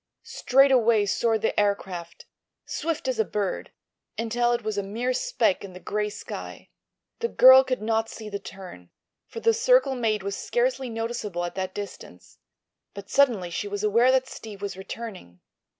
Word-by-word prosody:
Straight 270 +2 +3
away 230 -4 +4
soared 220 +2 0
the - - +1
aircraft, 190 -4 -2 0.4
swift 330 +5 -3
as - - -1
a - - +5
bird, 205 - -3 0.5
until 240 +1 0
it 240 -1 -1
was 215 -1 -2
a 200 - 0
mere 230 +6 -2
speck 225 -5 0
in 195 -2 -9
the 180 - -10
gray 210 +2 -2
sky. - - -8 0.5
The 465 - 0
girl 260 - +8
could 255 -4 -3
not 225 0 0
see 220 - -9
the 200 -1 -5
turn, 180 - -11 0.4
for 460 - -8
the 455 0 +4
circle 465 - +3
made 220 -5 -1
was 200 0 -3
scarcely 485 - -1
noticeable 225 -6 -3
at 175 - -5
that 190 -1 -4
distance, 195 - -9 0.6
but 200 0 -9
suddenly 230 -11 +3
she 205 - -3
was 205 0 -4
aware 230 +5 +4
that 260 0 +2
Steve 215 -5 -9
was 200 -1 -5
returning. 190 - -8
220 Hz, 170 wpm, -25 LUFS, 200-255 Hz, 0.6 s, girl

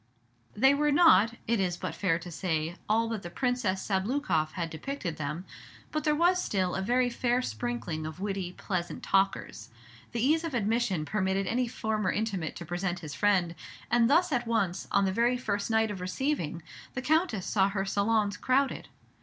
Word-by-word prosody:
They 265 +6 +5
were 295 +1 +2
not, 235 - +6
it 230 -1 +1
is 180 -2 0
but - - -4
fair 175 -5 +1
to 175 +1 -9
say, 165 -1 -2
all 225 +2 +3
that 225 -3 -3
the 175 - -7
Princess 235 -2 -1
Sabloukoff 190 - 0
had 170 -2 -3
depicted 170 - -4
them; 155 +4 -4 0.5
but 305 - -2
there 300 -1 +3
was 355 +3 +3
still 185 -3 0
a 190 - -1
very 245 +5 +2
fair 245 0 +1
sprinkling 210 -13 -3
of 155 +2 -8
witty, 195 -3 -3
pleasant 180 -3 -4
talkers. 195 - 0 0.4
The 235 - -3
ease 305 +7 +3
of 325 -6 -3
admission 215 -7 0
permitted 195 0 0
any 245 +5 0
former 220 -2 -1
intimate 200 -7 -2
to 170 - -7
present 175 +1 -2
his 155 -3 -7
friend, 190 -5 +2 0.4
and 240 -1 +4
thus 340 +4 +4
at 245 -3 0
once, 200 -6 0
on 200 0 +3
the 190 - 0
very 240 +4 +2
first 200 -4 -2
night 220 -1 +2
of 190 -3 -6
receiving, 180 - -2 0.3
the 255 - -3
Countess 310 - +1
saw 195 -2 +2
her 195 -1 -2
salons 205 +1 +1
crowded. 270 +1 +1
205 Hz, 180 wpm, -29 LUFS, 180-245 Hz, 0.5 s, not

